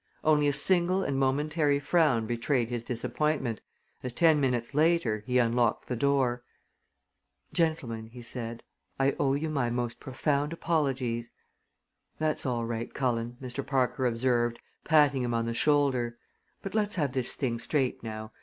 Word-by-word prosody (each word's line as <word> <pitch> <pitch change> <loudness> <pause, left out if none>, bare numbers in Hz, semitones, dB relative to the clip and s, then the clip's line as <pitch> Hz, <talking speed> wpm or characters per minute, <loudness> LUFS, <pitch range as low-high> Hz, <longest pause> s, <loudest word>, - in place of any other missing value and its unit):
Only 150 -1 +4
a - - +3
single 185 +3 +3
and 135 -4 -1
momentary 145 +2 +1
frown 145 -8 +2
betrayed 120 +1 0
his 120 -2 -3
disappointment 125 0 -2 0.4
as, 125 -2 -4
ten 160 +1 +4
minutes 125 -3 -1
later, 150 -9 +2
he 125 0 +2
unlocked 120 -2 +1
the 125 - -2
door. 125 -2 +1 1.1
"Gentlemen," 125 -10 -1
he 120 +1 -11
said, 115 -1 -5 0.4
"I 135 0 +2
owe 135 -1 +2
you 155 +3 -2
my 135 -5 0
most 120 0 -3
profound 145 +3 -1
apologies." 130 -8 -1 0.9
"That's 155 -2 0
all 120 -2 -1
right, 115 0 -4
Cullen," 120 -2 -2
Mr. 130 +1 -5
Parker 130 -1 0
observed, 120 0 +1 0.3
patting 145 -4 +4
him 120 -1 -1
on 115 0 0
the 115 - -2
shoulder; 130 -4 +1 0.5
"but 195 - -5
let's 210 -1 0
have 145 -7 0
this 130 -2 +2
thing 120 -4 -2
straight 130 0 -1
now. 110 -1 -6
130 Hz, 150 wpm, -29 LUFS, 120-150 Hz, 1.1 s, Only